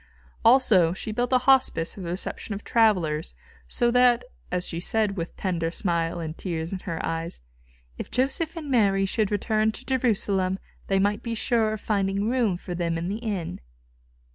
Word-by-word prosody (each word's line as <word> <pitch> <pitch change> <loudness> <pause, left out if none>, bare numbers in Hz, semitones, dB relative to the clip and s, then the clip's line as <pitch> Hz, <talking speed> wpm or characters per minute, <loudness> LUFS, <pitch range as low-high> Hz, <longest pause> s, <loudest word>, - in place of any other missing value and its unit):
Also, 225 -9 +5
she 205 +3 -4
built 245 +3 -1
a 255 - +6
hospice 265 -11 +3
for 200 - -9
the 170 - -5
reception 190 +3 -4
of 200 - -8
travellers, 175 - +2 0.3
so 240 - +1
that, 250 0 +4 0.3
as 180 0 -1
she 170 - -3
said 210 +2 0
with 170 -2 -5
tender 170 -4 -1
smile 170 -1 -1
and 160 -1 -5
tears 170 -1 -4
in 185 - -4
eyes, 165 - -3 0.6
"If - - -5
Joseph 275 +7 0
and 300 -4 -5
Mary 200 -5 +3
should 210 +1 0
return 215 +1 +1
to 255 - -10
Jerusalem, 200 -7 +1 0.3
they 195 - +2
might 205 +2 +1
be 230 -1 -3
sure 225 -1 +1
of 215 - -6
finding 200 -1 0
room 230 -7 +1
for 180 0 -7
them 170 -1 -1
in 170 +2 -3
the 210 +3 -3
inn." 195 - -4
200 Hz, 175 wpm, -25 LUFS, 175-230 Hz, 0.6 s, a